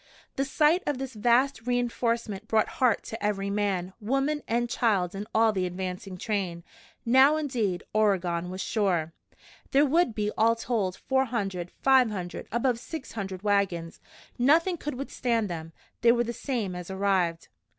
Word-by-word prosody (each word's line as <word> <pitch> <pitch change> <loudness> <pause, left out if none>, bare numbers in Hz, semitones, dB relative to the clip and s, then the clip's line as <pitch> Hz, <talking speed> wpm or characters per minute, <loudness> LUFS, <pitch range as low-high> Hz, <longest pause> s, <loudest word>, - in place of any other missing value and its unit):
The 270 - 0
sight 305 +5 +3
of 290 - 0
this 265 0 -5
vast 240 +2 +2
re 245 0 +2
enforcement 230 -4 -2
brought 220 -1 +2
heart 245 -5 +3
to 225 - -7
every 200 -1 -1
man, 195 -3 -1
woman 275 +7 0
and 240 +1 +1
child 200 -7 +1
in 200 +2 -5
all 225 0 +4
the 185 -2 0
advancing 185 +1 -5
train. 185 -5 -2 0.4
Now, 265 +5 +6
indeed, 235 -12 -1
Oregon 180 -5 +1
was 185 +1 -5
sure. 175 -7 0 0.6
There 280 +2 +4
would 295 -5 +2
be, 210 -1 -1
all 230 +1 +4
told, 220 -6 -1
four 265 0 +1
hundred 195 -7 -3
five 265 -3 +5
hundred 180 -4 -5
above 235 +1 +1
six 310 +3 -7
hundred 195 -3 -5
wagons. 195 -5 0 0.4
Nothing 325 +8 +4
could 295 -3 -5
withstand 235 -5 -1
them. 165 -1 -6 0.3
They 235 - +6
were 240 0 +2
the 235 0 -4
same 230 -9 -3
as 180 0 -7
arrived! 190 -4 0
220 Hz, 160 wpm, -27 LUFS, 190-250 Hz, 0.6 s, Now